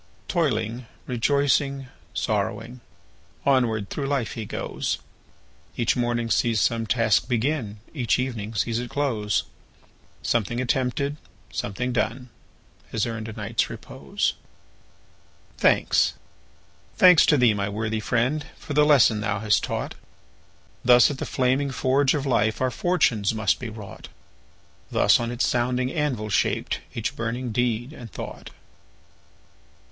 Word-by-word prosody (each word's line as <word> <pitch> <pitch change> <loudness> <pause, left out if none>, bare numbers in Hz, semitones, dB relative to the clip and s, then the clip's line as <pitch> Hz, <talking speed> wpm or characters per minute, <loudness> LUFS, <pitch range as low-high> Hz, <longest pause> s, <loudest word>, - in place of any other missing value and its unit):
Toiling,—rejoicing,—sorrowing, 125 - -1 0.6
Onward 115 -7 +2
through 140 -2 -2
life 135 -6 -1
he 110 - -5
goes; - - -3 0.8
Each 115 - +2
morning 120 -1 -1
sees 115 -3 +2
some 115 -1 +1
task 115 +1 +2
begin, 120 -3 -1 0.2
Each 125 -7 +1
evening 115 -4 -3
sees 115 +2 0
it 120 0 -5
close; 115 -8 0 0.8
Something 120 +1 0
attempted, 130 +3 0 0.4
something 120 +5 -2
done. 120 +2 -1 0.6
Has 110 - 0
earned 115 -2 -4
a 110 - -6
night's 110 +1 -1
repose. - - -3 1.3
Thanks, - - +3 0.8
thanks 180 -4 +7
to 150 - +5
thee, 125 -4 +5
my 100 0 -2
worthy 110 +1 -2
friend, 125 +7 0
For 145 - -7
the 150 +1 +5
lesson 120 -7 +5
thou 105 -1 -1
hast 105 -2 +2
taught! - - -3 0.9
Thus 125 +3 +6
at 135 - -6
the - - -3
flaming 130 +2 +1
forge 135 +2 +2
of 145 -1 -2
life 110 -4 +1
Our 130 -1 +1
fortunes 115 - +1
must 110 -2 +1
be 120 - -5
wrought; 105 -3 -10 0.8
Thus - - +4
on 120 0 -2
its 120 +2 0
sounding 125 0 0
anvil 130 -9 -1
shaped 100 - 0 0.2
Each - - -2
burning 120 +1 -3
deed 120 +3 -1
and 120 -8 -10
thought. - - -8
120 Hz, 125 wpm, -25 LUFS, 110-130 Hz, 1.3 s, thanks